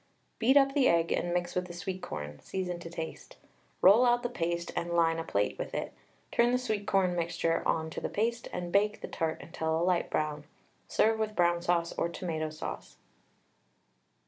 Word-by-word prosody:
Beat 260 +5 +5
up 275 -1 +5
the 275 -3 +4
egg 170 0 +3
and 175 - 0
mix 175 0 -1
with 180 0 -1
the 175 - -8
sweet 185 +1 -5
corn, 75 0 -6
season 180 -2 -4
to 170 - -8
taste. 165 -1 -7 0.5
Roll 205 +6 +8
out 240 0 +3
the 245 - -1
paste 170 -4 -2
and 170 - -2
line 165 -1 +3
a - - -2
plate 105 -9 -1
with - - -4
it, - - -3 0.4
turn 235 +1 +3
the 250 - +3
sweet 220 -5 -2
corn 185 -2 +2
mixture 165 -1 0
on 160 0 0
to - - -5
the - - -2
paste, 230 +2 -1
and 175 -1 -4
bake 210 +2 +2
the - - -5
tart 160 -1 -2
until 160 -1 -2
a - - +1
light 180 -1 +1
brown. 150 -1 -2 0.4
Serve 220 0 +2
with 215 -1 -1
brown 175 -2 +3
sauce 170 -1 +1
or 170 - +1
tomato 160 -3 -3
sauce. 155 +1 -7
175 Hz, 200 wpm, -30 LUFS, 165-210 Hz, 0.5 s, Roll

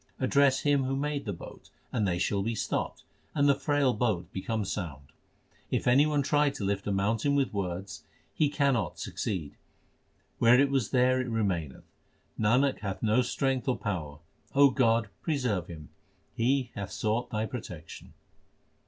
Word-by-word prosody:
Address 135 +1 +3
Him 145 -2 +2
who 135 +1 -1
made 145 +1 -2
the 105 - -2
boat, 85 - -10 0.2
and 110 -5 0
they 90 -1 0
shall 100 +2 0
be 115 +3 -2
stopped, - - -3 0.3
and 145 -1 +3
the 140 - +6
frail 140 -1 +1
boat 105 -6 -1
become 105 +2 -2
sound. 80 -8 -5 0.6
If - - -1
any 135 +5 +5
one 145 -2 +1
try 145 +1 +3
to 125 - -6
lift 100 0 -1
a - - 0
mountain 110 +8 +1
with 140 -4 +1
words, 95 -1 -4 0.3
he 150 - +2
cannot 140 -6 0
succeed; 85 -8 -4 0.9
where 120 +2 +6
it 140 0 +3
was 135 -6 +1
there 130 0 +3
it 125 - -4
remaineth. 95 - -2 0.5
Nanak 125 +6 +3
hath 100 0 -5
no 110 +3 +4
strength 130 0 -1
or 130 - +1
power; 85 -9 -4 0.4
O 140 -1 +7
God, 115 -3 +2
preserve 125 - -1
him; 80 -5 -10 0.4
he 125 +1 +1
hath 100 -1 -5
sought 110 +4 -1
Thy 110 0 -1
protection. 90 -10 -8
115 Hz, 160 wpm, -29 LUFS, 100-135 Hz, 0.9 s, O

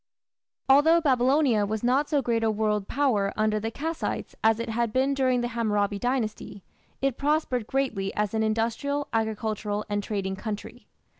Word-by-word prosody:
Although 295 +5 +6
Babylonia 260 -4 +3
was 215 +2 -3
not 265 +4 +2
so 290 -3 +1
great 230 -1 0
a 225 - +3
world 210 -1 0
power 235 -8 +1
under 215 0 +1
the 225 +2 -3
Kassites 320 +7 -4
as 220 0 +4
it 230 - -3
had 230 0 0
been 265 +4 +1
during 255 -2 +1
the 240 - -2
Hammurabi 210 -3 0
Dynasty, 220 -5 -3 0.4
it 275 -3 0
prospered 280 -6 0
greatly 225 -8 -1
as 210 -1 -1
an 220 - 0
industrial, 230 +7 -1
agricultural, 215 -2 -2
and 205 0 0
trading 195 -2 -3
country. 210 +1 -7
225 Hz, 160 wpm, -26 LUFS, 210-265 Hz, 0.4 s, Although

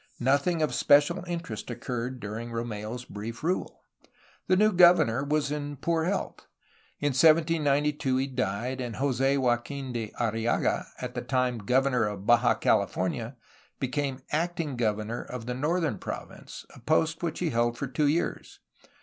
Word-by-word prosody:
Nothing 140 +6 +2
of 145 -5 0
special 145 +7 +4
interest 165 -13 -5
occurred 125 +1 -4
during 110 +3 -5
Romeu's 115 +1 -5
brief 115 +4 -7
rule. 180 +3 -2 0.6
The 185 - +4
new 215 +2 +4
governor 175 - +5
was 145 0 0
in 145 -1 -3
poor 165 +3 0
health. 195 +3 -3 0.5
In 145 - +1
1792 150 -2 +3
he 135 - +1
died 125 0 -2
and 120 -3 -4
Jos6 135 0 +1
Joaquin 130 +1 -1
de 115 -3 -4
Arrillaga, 115 0 0
at - - -5
the - - -3
time 125 -2 0
governor 125 +3 +2
of 100 -2 -5
Baja 120 0 +4
Califor 100 -4 +1
nia, 120 +2 -6 0.4
became 135 0 -2
acting 165 -2 -1
governor 110 0 -1
of 125 -2 -7
the 125 - -3
northern 150 - 0
province, - - -8
a - - -14
post 160 +5 +1
which 170 -3 -2
he 175 -3 -1
held 120 0 +1
for 140 - -2
two 140 +3 0
years. 160 +4 -1
130 Hz, 150 wpm, -28 LUFS, 120-150 Hz, 0.6 s, governor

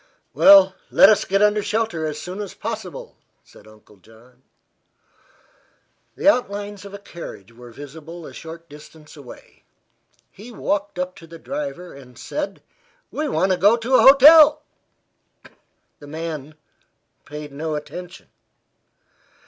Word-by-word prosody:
"Well, 195 -1 +7 0.2
let 195 - +6
us 215 -1 +2
get 195 +2 +1
under 210 0 +2
shelter 210 -7 -2
as 150 0 -5
soon 185 +5 -7
as 200 - -8
possible," 220 -5 -7 0.3
said - - -19
Uncle 110 -1 -20
John. 115 +5 -22 1.7
The - - -3
outlines 205 -7 0
of 200 0 -10
a - - -7
carriage 170 - -11
were 120 +1 -14
visible 160 +6 -11
a - - -11
short 165 +1 -11
distance 150 +1 -15
away. 140 -5 -15 0.7
He 220 +5 -13
walked 205 -4 -3
up 180 0 -4
to 165 - -14
the 165 0 -12
driver 275 - -7
and 125 -3 -15
said: 300 - -6 0.5
"We 305 0 -3
want 190 -6 0
to 185 - 0
go 210 +4 +4
to 240 +3 -4
a - - +6
hotel." 300 +2 +7 1.4
The 145 - -13
man 155 -1 -7 0.7
paid 150 0 -9
no 155 +2 -4
attention. 180 +4 -9
180 Hz, 135 wpm, -21 LUFS, 150-210 Hz, 1.7 s, Well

